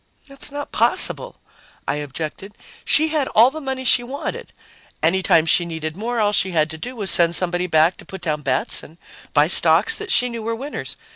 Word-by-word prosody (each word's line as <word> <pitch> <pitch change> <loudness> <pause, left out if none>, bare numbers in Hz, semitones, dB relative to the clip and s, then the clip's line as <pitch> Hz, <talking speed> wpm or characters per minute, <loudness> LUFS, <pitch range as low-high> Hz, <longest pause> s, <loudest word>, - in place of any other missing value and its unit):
"That's 275 0 -6
not 290 0 -7
possible," - - +1 0.5
I - - -1
objected. 155 +7 -7 0.3
"She 315 +1 +2
had 300 -4 -1
all 235 +4 +6
the 315 +2 -8
money 265 -2 -4
she 245 - +5
wanted. 260 +4 -6 0.5
Any 180 +4 +2
time 165 -3 +3
she 175 +2 +3
needed 160 -2 -6
more, 230 +4 -3
all 205 -1 +2
she 190 -2 +2
had 155 -1 +1
to 160 - -7
do 250 +9 -7
was 205 -4 +2
send 170 -2 +4
somebody 180 0 0
back 160 +1 +2
to - - -13
put 190 -1 -10
down 155 -3 -2
bets 130 -2 -1
and 160 - -15 0.4
buy 145 +1 +4
stocks 170 +2 +5
that 425 -2 -6
she 250 - +3
knew 235 -2 -6
were 230 +1 -3
winners. 275 +5 -6
190 Hz, 205 wpm, -20 LUFS, 160-255 Hz, 0.5 s, all